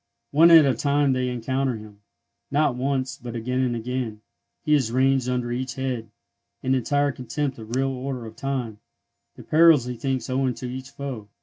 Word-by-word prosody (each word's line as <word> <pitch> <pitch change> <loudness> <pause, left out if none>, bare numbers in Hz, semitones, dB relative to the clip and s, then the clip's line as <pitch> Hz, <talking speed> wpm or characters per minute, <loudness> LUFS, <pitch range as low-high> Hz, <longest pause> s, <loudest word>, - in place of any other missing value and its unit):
One 160 +4 +6
at 165 -3 +9
a 135 - +3
time 140 +2 +2
they 130 0 0
encounter 130 +2 -1
him,—not 110 +7 -4
once, 135 +1 -2
but 120 -1 -7
again 125 +3 -2
and 125 -2 +1
again; 125 +2 -2
and 105 -1 -11 0.4
he 150 - +2
has 130 -6 +2
ranged 130 0 +2
under 125 -1 -1
each 130 +2 -3
head, 130 -4 -3 0.5
in 130 - +1
entire 145 +3 +1
contempt 130 +1 -4
of 110 +2 -6
real 135 +1 +1
order 130 -2 -5
of 110 0 -10
time, 125 -6 -3 0.6
the - - -11
perils 160 -5 +5
he 125 0 -4
thinks 130 -1 -2
owing 130 -1 0
to - - -7
each 130 +1 -6
foe. 135 -7 -6
130 Hz, 185 wpm, -24 LUFS, 120-135 Hz, 0.6 s, at